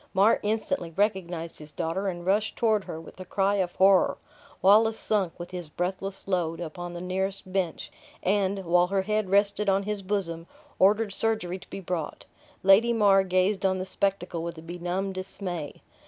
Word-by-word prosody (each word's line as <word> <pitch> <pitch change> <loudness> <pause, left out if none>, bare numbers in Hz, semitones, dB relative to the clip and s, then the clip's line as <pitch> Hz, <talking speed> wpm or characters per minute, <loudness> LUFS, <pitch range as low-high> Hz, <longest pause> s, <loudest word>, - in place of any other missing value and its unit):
Mar 200 +4 +5
instantly 215 -1 -1
recognized 175 -3 -1
his 150 0 -7
daughter, 170 +5 -2
and 175 -2 -4
rushed 205 +3 +1
toward 220 -4 +2
her 160 - -6
with 165 - -13
a - - -5
cry 195 +2 +1
of 180 -2 -1
horror. 190 0 +4 0.4
Wallace 220 +3 +5
sunk, 195 -6 -1
with 175 +1 -7
his 175 -4 -6
breathless 190 +4 -4
load, 170 -4 0
upon 175 +1 -6
the 175 - -5
nearest 190 +1 -3
bench; 185 -4 -2 0.3
and, 195 0 +1
while 175 +1 +4
her 195 0 0
head 210 -1 -1
rested 200 +1 +2
on 195 +1 +2
his 210 0 -3
bosom, 180 -4 -3 0.3
ordered 205 +2 +4
surgery 200 -5 -1
to - - -16
be 195 - -6
brought. 170 -4 -4 0.4
Lady 205 +5 +6
Mar 200 -3 +5
gazed 190 +2 +1
on 190 -1 +2
the 185 - -3
spectacle 185 -2 -1
with 170 0 -5
a 160 - -10
benumbed 180 +3 -3
dismay. 185 -4 -6
190 Hz, 175 wpm, -27 LUFS, 175-200 Hz, 0.4 s, Lady